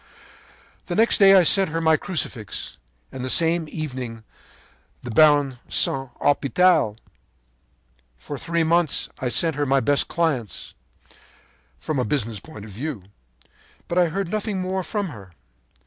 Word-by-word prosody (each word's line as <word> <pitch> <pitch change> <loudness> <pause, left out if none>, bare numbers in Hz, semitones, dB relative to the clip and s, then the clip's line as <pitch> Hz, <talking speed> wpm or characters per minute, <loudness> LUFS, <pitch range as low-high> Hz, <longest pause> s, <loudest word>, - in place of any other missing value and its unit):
“The 175 - -3
next 225 +4 +3
day 195 -1 +7
I 185 - +6
sent 195 +2 +5
her 165 +1 -2
my 160 -1 +3
Crucifix, 140 - -3 0.3
and 130 - -7
the 130 - -3
same 165 +2 +2
evening 125 -8 -6 0.8
the 120 - -6
Baron 145 -1 +4
de - - -23
Saint 135 -1 +1
Hospital. 145 - +2 1.2
“For 70 - -8
three 170 0 -1
months 165 -1 +1
I 130 - -2
sent 160 +4 +1
her 145 - 0
my 135 +1 +3
best 145 +1 +2
clients, 155 - -3 1.0
from 140 - -3
a - - +1
business 115 -3 -2
point 105 -5 -12
of 105 - -11
view. 120 0 -6 0.8
But 175 - 0
I 175 - +4
heard 185 +2 -3
nothing 210 -1 -2
more 185 +1 -2
from 200 +1 -3
her. 100 - -12
155 Hz, 150 wpm, -22 LUFS, 125-175 Hz, 1.2 s, day